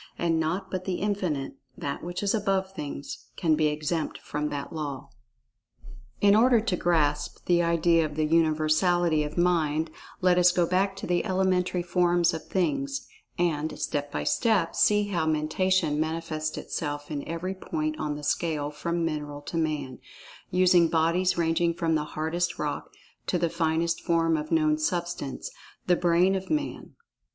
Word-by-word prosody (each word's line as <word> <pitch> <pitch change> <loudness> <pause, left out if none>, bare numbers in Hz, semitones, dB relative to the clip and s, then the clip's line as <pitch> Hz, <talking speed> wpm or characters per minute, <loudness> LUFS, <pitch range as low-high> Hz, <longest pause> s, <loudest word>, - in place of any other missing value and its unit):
And 165 -1 +1
naught 160 +5 -2
but 185 -1 -3
The 185 - -1
Infinite—That 140 -9 -3
which 175 +3 -4
is 200 - +1
above 195 -3 0
Things—can 150 +2 -3
be 155 0 +3
exempt 150 +2 -2
from 150 0 -3
that 140 +2 -5
law. 145 -4 -5 1.1
In 205 0 +5
order 240 +2 +5
to 215 -4 -1
grasp 155 -4 0
the 175 -1 +3
idea 170 0 +3
of 150 -1 -4
the 155 0 +1
Universality 160 +1 +2
of 150 +2 -6
Mind, 160 -3 +1 0.3
let 180 -1 +4
us 180 0 +6
go 175 -1 +2
back 190 +3 +1
to 195 - -6
the 175 0 +1
elementary 185 -1 +1
forms 175 -1 +2
of 160 - -6
Things, 275 +7 -1 0.3
and, 160 -3 0
step 145 -1 -2
by - - -2
step, 210 -8 +2
see 210 -1 +3
how 170 -5 0
Mentation 155 +1 +1
manifests 155 -1 -2
itself 145 -1 -4
in 145 -2 -3
every 170 +3 -3
point 155 -4 -3
on 150 -1 -2
the 150 - -8
scale 150 -1 -1
from 170 +3 -2
mineral 150 -2 -4
to 165 - -7
man—using 165 +4 0
bodies 170 +3 +2
ranging 170 0 +1
from 165 -1 0
the 150 -1 0
hardest 170 +3 -1
rock - - -3 0.4
to 180 - +1
that 170 -1 -1
finest 165 0 0
form 165 -2 +2
of 155 +1 -4
known 155 -1 +3
Substance—the 175 +1 -3
Brain 175 +2 +3
of 190 0 -3
Man. 300 -1 -3
165 Hz, 155 wpm, -27 LUFS, 155-180 Hz, 1.1 s, us